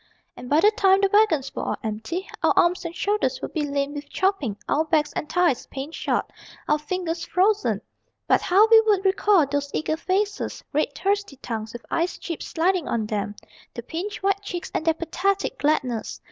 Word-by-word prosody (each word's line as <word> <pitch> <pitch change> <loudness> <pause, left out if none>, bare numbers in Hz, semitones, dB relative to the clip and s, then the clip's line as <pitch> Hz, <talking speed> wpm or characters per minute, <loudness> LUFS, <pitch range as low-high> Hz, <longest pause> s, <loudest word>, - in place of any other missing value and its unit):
And 250 - -9
by 295 - +4
the 420 - +6
time 385 -4 +4
the 395 -1 +2
wagons 395 -11 +3
were - - -4
all - - -1
empty 225 - -4
Our - - +4
arms 355 +1 +3
and 335 0 -5
shoulders 420 +6 0
would - - -6
be 300 -3 -1
lame 280 0 -1
with 290 -1 -7
chopping, 375 - 0
Our 310 - +2
backs 310 -2 +1
and 300 - -4
thighs 350 -8 +2
pain 275 +3 -6
shot, - - -2 0.4
our 300 - +2
fingers 335 +2 -3
frozen. 400 +5 +1 0.5
But - - +4
how 395 +4 +5
we 450 -1 +8
would 415 -3 +1
recall 385 -3 +4
those 285 +1 -2
eager 310 +1 -1
faces, 400 +4 -2
Red 290 -1 0
thirsty 400 -2 -1
tongues 225 -4 -5
with 240 - -9
ice 340 +2 0
chips 335 -3 -6
sliding 350 0 +1
on 225 -2 -1
them, 205 -1 -3 0.4
The 235 - -6
pinched 385 - -5
white 395 0 +1
cheeks, 360 -4 -6
and - - -1
their 325 -1 +3
pathetic 380 +4 -1
gladness. 255 -6 0
335 Hz, 190 wpm, -24 LUFS, 285-390 Hz, 0.5 s, we